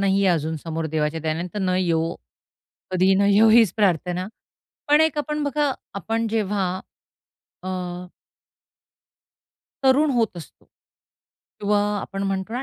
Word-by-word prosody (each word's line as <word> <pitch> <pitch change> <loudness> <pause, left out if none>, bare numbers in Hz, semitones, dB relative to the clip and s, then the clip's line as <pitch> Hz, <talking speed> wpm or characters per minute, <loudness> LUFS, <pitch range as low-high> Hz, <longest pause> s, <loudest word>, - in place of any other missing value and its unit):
नाहीये 195 0 +2
अजून, 160 -2 0
समोर 165 +1 -4
देवाच्या 155 +1 -1
दयेने, 160 +3 -2
तर - - -2
न 185 -2 0
येवो, 165 -2 0 0.8
कधीही 185 +1 +3
न 200 - +2
येवो 220 +2 +6
हीच 225 -5 +5
प्रार्थना. 180 -3 0 0.6
पण 295 +2 +5
एक 315 -2 +1
आपण 300 0 -2
बघा, 290 0 0 0.2
आपण 225 +4 -2
जेव्हा, 210 -3 0 1.0
अ - - -6 2.2
तरुण 280 +3 +4
होत 230 -7 0
असतो. 170 - -12 0.9
किंवा 205 0 +2 0.2
आपण 195 0 -5
म्हणतो 195 +1 -2
ना, 250 +3 -2
195 Hz, 130 wpm, -23 LUFS, 175-225 Hz, 2.2 s, येवो